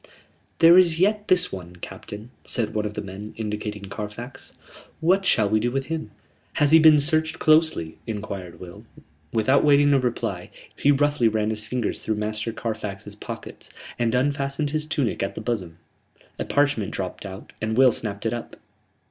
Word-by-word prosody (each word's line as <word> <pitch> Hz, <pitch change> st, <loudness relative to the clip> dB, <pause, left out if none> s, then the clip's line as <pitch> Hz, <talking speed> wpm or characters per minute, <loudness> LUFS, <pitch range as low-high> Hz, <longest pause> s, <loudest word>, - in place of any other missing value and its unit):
"There 170 Hz, +2 st, +8 dB
is 170 Hz, -3 st, +3 dB
yet 210 Hz, +3 st, +2 dB
this 180 Hz, -1 st, +3 dB
one, 90 Hz, -2 st, -8 dB
captain," 105 Hz, +5 st, -9 dB
said 115 Hz, -3 st, -1 dB
one 105 Hz, 0 st, -1 dB
of 105 Hz, -, -8 dB
the -, -, -4 dB
men, 100 Hz, +2 st, -8 dB
indicating 105 Hz, -1 st, -4 dB
Carfax. 105 Hz, +6 st, -8 dB, 0.5 s
"What 185 Hz, +4 st, +2 dB
shall 110 Hz, -3 st, +4 dB
we 110 Hz, +2 st, +2 dB
do 120 Hz, +3 st, 0 dB
with 135 Hz, +2 st, -2 dB
him?" 160 Hz, -1 st, -4 dB, 0.4 s
"Has 145 Hz, -1 st, +2 dB
he 160 Hz, -, +8 dB
been 155 Hz, -1 st, +7 dB
searched 155 Hz, +2 st, +1 dB
closely?" 155 Hz, -, +2 dB
enquired 100 Hz, -5 st, -6 dB
Will. 90 Hz, -1 st, -10 dB, 0.5 s
Without 130 Hz, +5 st, +3 dB
waiting 145 Hz, -1 st, +5 dB
a 135 Hz, -, +4 dB
reply, 125 Hz, -2 st, -3 dB, 0.3 s
he 145 Hz, -, +1 dB
roughly 145 Hz, -3 st, +2 dB
ran 110 Hz, 0 st, 0 dB
his 105 Hz, -1 st, -3 dB
fingers 120 Hz, -1 st, -2 dB
through 110 Hz, -, -1 dB
Master 105 Hz, +1 st, -2 dB
Carfax's 110 Hz, -4 st, -5 dB
pockets, -, -, -9 dB, 0.3 s
and 120 Hz, 0 st, +1 dB
unfastened 140 Hz, +2 st, 0 dB
his 155 Hz, 0 st, -2 dB
tunic 145 Hz, -7 st, -1 dB
at 95 Hz, -, -2 dB
the -, -, -5 dB
bosom. 100 Hz, -8 st, -3 dB, 0.6 s
A -, -, -2 dB
parchment 145 Hz, -8 st, +1 dB
dropped 95 Hz, -2 st, -5 dB
out 95 Hz, 0 st, -9 dB
and 110 Hz, +1 st, -1 dB
Will 130 Hz, -1 st, +7 dB
snapped 105 Hz, -2 st, -4 dB
it 115 Hz, -, 0 dB
up. 120 Hz, -, -6 dB
115 Hz, 175 wpm, -24 LUFS, 105-145 Hz, 0.6 s, There